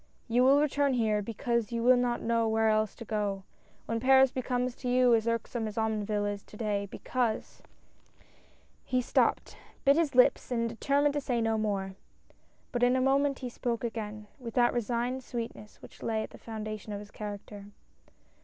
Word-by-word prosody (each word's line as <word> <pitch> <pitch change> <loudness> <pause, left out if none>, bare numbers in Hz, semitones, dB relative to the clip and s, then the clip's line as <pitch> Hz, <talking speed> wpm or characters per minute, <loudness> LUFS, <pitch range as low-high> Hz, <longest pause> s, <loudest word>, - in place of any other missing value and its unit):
You 245 +1 +3
will 275 +2 +6
return 285 -2 +2
here 215 -3 +1
because 230 +2 -2
you 230 0 -2
will 255 +1 +7
not 245 -1 0
know 230 0 +1
where 220 0 +2
else 215 -1 +1
to 230 - -9
go, 205 -3 -2 0.4
when 230 0 -2
Paris 265 +1 +5
becomes 250 -1 -1
to 250 - -4
you 250 -1 +4
as 225 0 +2
u'ksome 230 0 -1
as 210 - -7
Omonville 215 -2 0
is 205 -1 -3
to 210 - -14
day, 205 -2 -1
because 240 -1 -2 0.6
" - - -32
He 255 - +3
stopped, 250 - +1 0.3
bit 275 +1 +6
his 320 -6 +1
lips, 250 - +4
and 230 -2 0
determined 280 +5 +1
to 290 - -1
say 245 -3 -1
no 225 -1 +1
more. 200 -3 -1 0.8
But 240 - -2
in 245 +1 +4
a - - +2
moment 275 +1 +2
he - - -3
spoke 240 -1 -3
again, 215 -2 -5
with 235 -3 -8
that 240 -1 +4
resigned 240 +2 -1
sweetness 230 -3 -7
which - - -14
lay 220 -1 -1
at - - -8
the - - -13
foundation 215 -1 -6
of 200 - -4
his 205 0 -11
character. 205 -1 -7
230 Hz, 185 wpm, -30 LUFS, 215-250 Hz, 0.8 s, will